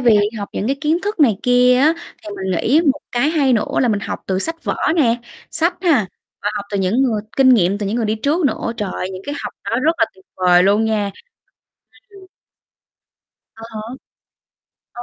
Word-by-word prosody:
vì 235 -4 +5 0.2
học 200 - -5
những 205 - -3
cái 275 +3 0
kiến 315 +2 +1
thức 410 -4 -3
này 230 -9 +5
kia 250 0 +4
á 310 +4 +4 0.3
thì 210 - -9
mình 190 -1 -3
nghĩ 285 - +3
một 290 - -11
cái 270 +5 +2
hay 285 -5 +2
nữa 225 - 0
là 250 - +2
mình 210 -3 0
học - - -5
từ 190 -1 0
sách 325 +10 -4
vở - - -1 0.2
nè, 240 -7 +3 0.3
sách 335 +3 +1
ha, 285 - +3 0.4
và 205 - 0
học 200 - -4
từ 200 - -1
những 195 +8 +1
người 225 -6 +1 0.2
kinh 265 -1 +5
nghiệm 195 -1 +2
từ 205 - -3
những 210 +4 -1
người 230 - 0
đi 215 - 0
trước 305 +6 +1
nữa, 230 - -2
trời 205 -3 -3
ơi, 185 - -4
những 185 - -8
cái 290 - -3
học - - -5
đó 230 - -1
rất 320 +2 +4
là - - +5
tuyệt 190 0 -22
vời 180 -1 +4
luôn 205 +3 +3
nha. 210 -2 0 1.0
Ừm. 390 -2 -15 1.3
À 225 - -13
há. 215 - -5 1.1
À 240 - -8
230 Hz, 215 wpm, -19 LUFS, 200-285 Hz, 1.3 s, vì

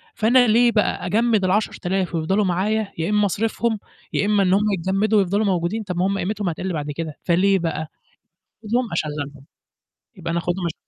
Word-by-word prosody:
فأنا 245 +3 +4
ليه 235 +2 +4
بقى 210 -4 0
أجمّد 220 +1 +2
ال10000 185 -2 -1
ويفضلوا 190 +6 +1
معايا 200 +4 0
يا 165 +4 -1
إمّا 210 -1 +3
أصرفهم، 225 +2 -1 0.3
يا 200 - +1
إمّا 205 -1 +3
إنّهم 190 +2 +3
يتجمّدوا 195 +4 +1
ويفضلوا 200 +3 +1
موجودين، 185 +3 0
طَب 180 -4 -5
ما 180 - +2
هم 200 0 -1
قيمتهم 195 0 -2
هتقِل 180 +2 -4
بعد 150 -1 -3
كده، 155 0 -5
فليه 190 +2 +3
بقى؟ 160 -2 -3 0.8
آخُدهم 235 0 -1
أشغلهم، 145 -3 -4 0.7
يبقى 170 - -5
أنا 170 - 0
آخُدهم 175 +1 -2
أش 170 - -2
195 Hz, 170 wpm, -22 LUFS, 170-215 Hz, 0.8 s, فأنا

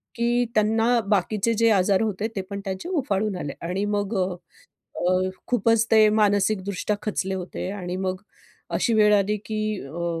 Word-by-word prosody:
की 240 +1 +1
त्यांना 225 +3 +3
बाकीचे 210 +2 +1
जे 230 +1 +4
आजार 195 0 +3
होते 215 -1 -1
ते 195 - -1
पण 200 -1 -4
त्यांचे 190 - -4
उफाळून 215 - -1
आले 145 -5 -4 0.2
आणि 190 +3 -1
मग 205 +1 -1
अ, - - -1 0.7
अ, 185 +1 +1 0.2
खूपच 230 -1 +2
ते 220 -1 +6
मानसिकदृष्ट्या 205 -1 +1
खचले 195 -2 -2
होते 185 0 -5
आणि 180 -3 -5
मग 185 0 -2 0.5
अशी 230 - +1
वेळ 210 -1 +5
आली 205 +1 +2
की 215 -1 -3 0.3
अ, 170 +3 -3
205 Hz, 160 wpm, -24 LUFS, 190-220 Hz, 0.7 s, ते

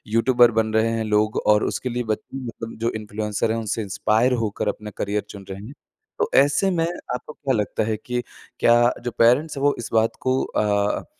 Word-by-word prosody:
YouTuber 120 0 +5
बन 110 0 0
रहे 110 +1 +3
हैं 115 -1 -1
लोग 105 0 +1
और 105 0 +5
उसके 125 - -2
लिए 120 +1 -2
ब 110 -1 -1 0.2
मतलब 115 -3 -6
जो 115 +1 +1
इन्फ्लुएंसर 105 0 -2
हैं 115 - -1
उनसे 110 0 -2
इंस्पायर 110 +5 +1
होकर 105 0 -2
अपना 105 +1 -3
करियर 105 +1 -1
चुन 100 -2 -10
रहे 95 +2 -7
हैं। 135 - -10 0.5
तो 450 0 +1
ऐसे 145 +7 +3
में 165 -2 +1 0.3
आपको 150 +4 -8
क्या 135 -2 -2
लगता 105 0 -1
है 110 0 -1
कि 125 0 -1 0.4
क्या 120 0 +5 0.2
जो 120 - -2
पेरेंट्स 135 +8 +3
हैं 135 - -3
वो 145 0 +4
इस 115 - -5
बात 110 0 +2
को 130 0 +1
अ, 105 -1 0
115 Hz, 205 wpm, -23 LUFS, 105-125 Hz, 0.5 s, YouTuber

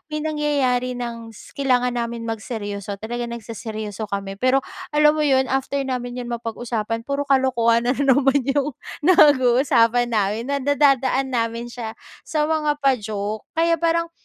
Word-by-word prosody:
may 305 - -2
nangyayari 275 -5 0
ng 230 -1 -6
s 220 - -15
kailangan 250 -3 +1
namin 235 -1 -3
magseryoso. 205 -3 -5
Talagang 240 +2 -4
nagseseryoso 220 -2 -6
kami. 195 -1 -3
Pero 255 +3 +3 0.3
alam 300 0 +4
mo 310 - 0
'yon, 265 -3 +3
after 270 +1 -1
namin 250 -1 -4
'yon 245 - -5
mapag-usapan, 230 -1 -4
puro 280 0 -1
kalokohan 240 -3 +3
na 250 - +2
naman 275 0 +3
'yong 280 0 0 0.3
nag-uusapan 250 -6 +4
namin, 215 +4 -1
na 280 - +1
nadadaan 270 -2 +2
namin 235 -1 -2
siya 225 -2 -6 0.3
sa 305 -2 0
mga 300 -2 0
pa-joke. 215 -5 -1
Kaya 335 +1 +2
parang 335 +1 +1
245 Hz, 145 wpm, -22 LUFS, 230-280 Hz, 0.3 s, alam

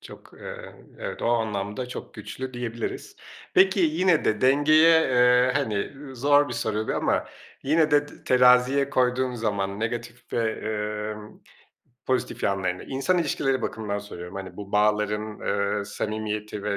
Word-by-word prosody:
Çok, - - -13
eee, - - -9 0.2
evet, - - -6
o - - 0
anlamda 110 0 -1
çok 125 - -8
güçlü 130 0 -7
diyebiliriz. 120 -1 -5 0.4
Peki 190 +1 +5
yine 165 0 +2
de 110 -1 +1
dengeye, 155 +5 +5
eee, 125 -1 +4
hani, 135 -7 0 0.2
ııı, 135 -2 -10
zor 145 +3 +4
bir - - -5
soru 110 -1 -2
bu - - 0
ama - - 0 0.4
yine 155 +2 +2
de 145 0 +3
t - - -16
teraziye 125 +2 +4
koyduğun 125 -2 +1
zaman, 100 -3 -2
negatif 120 +1 -5
ve, 115 -2 0
emm, 105 0 -5 0.7
pozitif 130 -1 -1
yanlarını, 95 -2 -1
insan 140 +7 0
ilişkileri 135 -5 0
bakımından 105 -2 -3
soruyorum, 90 -3 -9
hani, 95 -2 -7
bu 100 -1 -9
bağların, 105 0 0
ııı, 100 0 -1
samimiyeti 105 0 -4
ve 100 -1 -1
120 Hz, 145 wpm, -25 LUFS, 105-135 Hz, 0.7 s, Peki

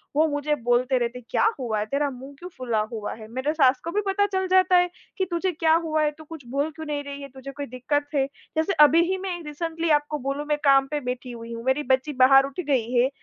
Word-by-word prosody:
वो 315 +1 +4
मुझे 295 0 -1
बोलते 245 +1 +1
रहते 240 +1 -2
हैं, 235 - -19
"क्या - - +2
हुआ 220 -4 -1
है, 210 - -1
तेरा 280 +4 -1
मुँह 265 +2 -10
क्यों 360 +1 -8
फुला 235 -4 -1
हुआ 215 -2 -4
है?" 215 -1 -11
मेरे 260 +5 -1
सास 265 -4 +4
को 335 - -4
भी 415 +3 0
पता 405 +1 +2
चल 380 0 0
जाता 370 0 +4
है 355 0 +3 0.3
कि 380 - +1
तुझे 360 +2 0
क्या 320 0 +2
हुआ 310 -1 0
है, 300 - +1
तू 315 +1 -14
कुछ 310 -4 -11
बोल 280 +5 -1
क्यों 315 - -7
नहीं 290 -1 -3
रही 280 0 -7
है, 275 - -8
तुझे 265 +1 -9
कोई 285 +1 -6
दिक्कत 285 +4 -2
है? 270 -1 +3 0.3
जैसे 320 +5 +1
अभी 330 +3 +4
ही 380 - 0
मैं 370 -2 -4
रीसेंटली 330 +2 -3
आपको 295 +1 -5
बोलूँ, 275 +3 -3
मैं 295 0 0
काम 270 -1 +5
पे 295 - 0
बैठी 250 0 -5
हुई 230 0 -8
हूँ, 230 0 -7
मेरी 265 +3 +1
बच्ची 270 +3 0
बाहर 270 +1 +7
उठ 280 +5 -8
गई 245 -4 +1
है। 250 +1 +3
285 Hz, 260 wpm, -24 LUFS, 255-320 Hz, 0.3 s, बाहर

